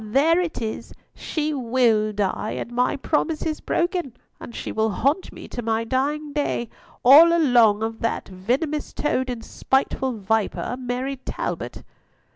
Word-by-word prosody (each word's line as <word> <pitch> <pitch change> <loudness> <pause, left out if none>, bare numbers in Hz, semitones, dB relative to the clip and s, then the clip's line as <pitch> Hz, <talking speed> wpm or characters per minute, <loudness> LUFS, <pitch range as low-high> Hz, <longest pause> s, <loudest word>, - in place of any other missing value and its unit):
there 280 +10 +3
it 330 -9 -3
is! 220 - -5 0.2
She 310 -1 -3
will 235 -5 +2
die, 205 +1 -2
and 235 - -5
my 250 +1 +1
promise 305 +2 -1
is 310 -1 -2
broken, 345 - -1 0.2
and 235 - -10
she - - -5
will 220 0 +1
haunt 280 - 0
me - - -10
to 240 - -5
my 225 0 0
dying 285 +5 -1
day, 285 -5 -1 0.4
all 305 +6 +9
along 240 -10 +4
of 225 0 -3
that 230 - -2
venomous 255 - -2
toad 260 -3 -1
and 240 -2 -5
spiteful 265 -1 0
viper, 220 +3 -1
Mary 255 +2 -3
Talbot." 260 - -5
255 Hz, 150 wpm, -23 LUFS, 225-295 Hz, 0.4 s, all